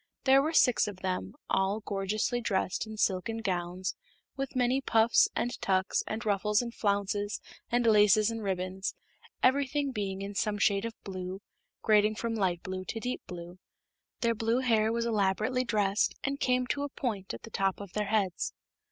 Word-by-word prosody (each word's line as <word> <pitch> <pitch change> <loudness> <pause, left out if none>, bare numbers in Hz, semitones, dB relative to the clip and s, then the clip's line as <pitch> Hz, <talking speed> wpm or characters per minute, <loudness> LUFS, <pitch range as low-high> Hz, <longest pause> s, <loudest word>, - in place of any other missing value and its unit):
There 270 0 +6
were 310 +3 0
six 250 -9 +4
of 195 -3 -7
them, 185 - -3
all 195 +3 +1
gorgeously 210 +5 -1
dressed 200 -1 -1
in 215 0 -8
silken 205 +3 0
gowns 185 -3 -2 0.4
with 270 -1 -4
many 255 +1 +2
puffs 225 -2 +4
and 245 - 0
tucks 190 0 +1
and 220 +2 -4
ruffles 210 0 +2
and 235 -1 -3
flounces 205 0 -1 0.3
and 240 0 +1
laces 210 0 +5
and 225 0 -4
ribbons, 190 -1 -2 0.5
everything 280 +1 +2
being 195 -4 -3
in 200 +1 -5
some 210 +1 0
shade 200 +1 +2
of 230 -1 -5
blue, 185 -1 -5 0.4
grading 215 0 +4
from 230 +1 -2
light 185 -5 0
blue 185 0 -4
to 225 - -4
deep 250 +2 -3
blue. 175 0 -8 0.6
Their 235 -1 +3
blue 230 +2 0
hair 225 -3 +3
was 230 0 0
elaborately 215 +3 +1
dressed 210 -3 +1
and 275 +1 -2
came 250 0 +2
to 265 +4 -2
a 285 - -2
point 215 -8 -3
at - - -12
the 230 - -10
top 195 -2 0
of 200 -3 -9
their 210 -1 -1
heads. 200 -5 0
210 Hz, 175 wpm, -30 LUFS, 195-235 Hz, 0.6 s, There